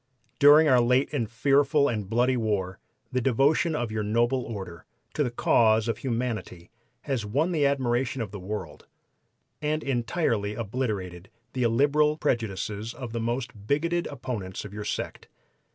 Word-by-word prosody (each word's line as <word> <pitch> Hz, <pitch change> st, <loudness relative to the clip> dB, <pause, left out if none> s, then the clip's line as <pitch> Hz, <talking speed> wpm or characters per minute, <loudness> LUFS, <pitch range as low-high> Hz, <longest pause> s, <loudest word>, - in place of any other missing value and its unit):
"'During 150 Hz, +2 st, +7 dB
our 130 Hz, -3 st, +5 dB
late 125 Hz, +3 st, +2 dB, 0.2 s
fearful 140 Hz, +5 st, +3 dB
and 105 Hz, -7 st, -3 dB
bloody 125 Hz, +3 st, +2 dB
war 100 Hz, -5 st, -1 dB, 0.3 s
the 125 Hz, -1 st, 0 dB
devotion 140 Hz, +6 st, +2 dB
of 120 Hz, -6 st, -2 dB
your 110 Hz, 0 st, -2 dB
noble 120 Hz, +5 st, +1 dB
order 95 Hz, -7 st, -7 dB, 0.3 s
to 150 Hz, -, +1 dB
the 125 Hz, -, -1 dB
cause 110 Hz, -2 st, +3 dB
of 115 Hz, -2 st, -2 dB
humanity 115 Hz, -8 st, -4 dB, 0.3 s
has 135 Hz, -6 st, -2 dB
won 140 Hz, -, 0 dB
the 150 Hz, -4 st, +2 dB
admiration 130 Hz, -1 st, 0 dB
of 110 Hz, -5 st, -4 dB
the 105 Hz, -, -7 dB
world, 105 Hz, +4 st, -6 dB, 0.7 s
and 155 Hz, +1 st, -1 dB
entirely 120 Hz, -5 st, -1 dB
obliterated 100 Hz, -6 st, -4 dB, 0.2 s
the 130 Hz, -, -2 dB
illiberal 145 Hz, +6 st, +3 dB
prejudices 110 Hz, -5 st, -2 dB
of 125 Hz, -4 st, -7 dB
the 115 Hz, -, -2 dB
most 115 Hz, -3 st, -4 dB
bigoted 170 Hz, +5 st, 0 dB
opponents 115 Hz, -9 st, -5 dB
of 100 Hz, -, -9 dB
your 105 Hz, 0 st, -6 dB
sect. -, -, -4 dB
120 Hz, 150 wpm, -26 LUFS, 105-140 Hz, 0.7 s, During